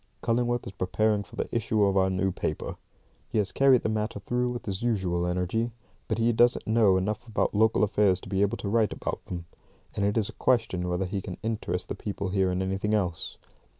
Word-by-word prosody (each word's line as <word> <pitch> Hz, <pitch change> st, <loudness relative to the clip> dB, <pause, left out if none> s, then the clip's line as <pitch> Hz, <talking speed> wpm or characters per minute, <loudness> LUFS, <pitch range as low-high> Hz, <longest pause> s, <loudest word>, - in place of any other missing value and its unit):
Cullingworth 120 Hz, +1 st, +1 dB
is -, -, -6 dB
preparing 105 Hz, +3 st, +1 dB
for -, -, -12 dB
the -, -, -2 dB
issue 110 Hz, -2 st, +2 dB
of 100 Hz, -1 st, +3 dB
our 95 Hz, -1 st, +3 dB
new 95 Hz, +1 st, 0 dB
paper. -, -, -3 dB, 0.5 s
He -, -, -2 dB
has 105 Hz, -2 st, +1 dB
carried 135 Hz, -3 st, +4 dB
the -, -, +1 dB
matter 110 Hz, -1 st, -2 dB
through 125 Hz, +5 st, -1 dB
with 120 Hz, -1 st, -5 dB
his 95 Hz, -2 st, -3 dB
usual 95 Hz, -7 st, 0 dB
energy, 90 Hz, +6 st, 0 dB, 0.4 s
but 110 Hz, -, -1 dB
he 115 Hz, +1 st, +2 dB
doesn't 120 Hz, +2 st, +4 dB
know 110 Hz, -4 st, +4 dB
enough 105 Hz, +5 st, -2 dB
about 110 Hz, -, 0 dB
local 110 Hz, +1 st, +3 dB
affairs 100 Hz, -3 st, +3 dB
to -, -, -11 dB
be 95 Hz, -1 st, 0 dB
able 100 Hz, 0 st, +1 dB
to -, -, -5 dB
write 110 Hz, +1 st, +2 dB
about -, -, -4 dB
them, 85 Hz, -2 st, -6 dB, 0.5 s
and 100 Hz, -, 0 dB
it 100 Hz, +2 st, +1 dB
is 110 Hz, -3 st, +2 dB
a -, -, -8 dB
question 110 Hz, -8 st, +1 dB
whether 90 Hz, +2 st, 0 dB
he 95 Hz, +1 st, -3 dB
can 90 Hz, -1 st, -7 dB
interest 105 Hz, -5 st, -2 dB
the -, -, -3 dB
people 100 Hz, -2 st, -4 dB
here 95 Hz, -1 st, +1 dB
in 90 Hz, +1 st, 0 dB
anything 95 Hz, +3 st, 0 dB
else. 90 Hz, -5 st, -2 dB
105 Hz, 220 wpm, -27 LUFS, 95-115 Hz, 0.5 s, carried